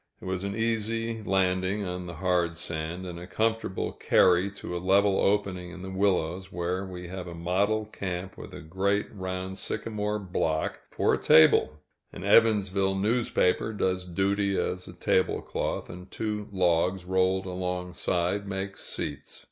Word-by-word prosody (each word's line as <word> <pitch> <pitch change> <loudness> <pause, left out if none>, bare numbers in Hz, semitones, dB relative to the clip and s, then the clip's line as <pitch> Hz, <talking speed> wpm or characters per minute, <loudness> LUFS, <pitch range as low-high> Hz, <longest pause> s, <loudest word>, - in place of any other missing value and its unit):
It - - -12
was 95 0 -2
an 100 0 -3
easy 115 0 -1
landing 95 0 +1
on 90 0 -4
the 85 - -7
hard 85 -1 +1
sand, 85 +3 -4
and 85 -1 -6
a 90 - -9
comfortable 110 -1 -1
carry 90 +1 +4
to 95 -3 -6
a 85 - -3
level 100 +1 +4
opening 95 -3 +1
in 90 +1 -9
the 95 - -6
willows, 95 -1 0
where 90 +2 -2
we 90 -2 -7
have 90 -1 -6
a 85 - -7
model 100 +6 +1
camp 95 -3 -5
with - - -10
a 90 - -8
great 95 +5 0
round 95 -1 -4
sycamore 105 -1 -2
block 85 -5 -1
for - - +1
a - - +1
table; 80 -1 +6 0.3
an - - -8
Evansville 100 -2 +4
newspaper 110 -1 +1
does 95 -3 0
duty 100 +2 0
as 90 0 -2
a 90 - -9
tablecloth, 90 +1 0
and 90 +1 -10
two 105 -1 -3
logs 90 0 +2
rolled 95 +1 +2
alongside 90 +1 -1
make 95 0 -4
seats. 75 -1 -5
95 Hz, 155 wpm, -28 LUFS, 90-100 Hz, 0.3 s, table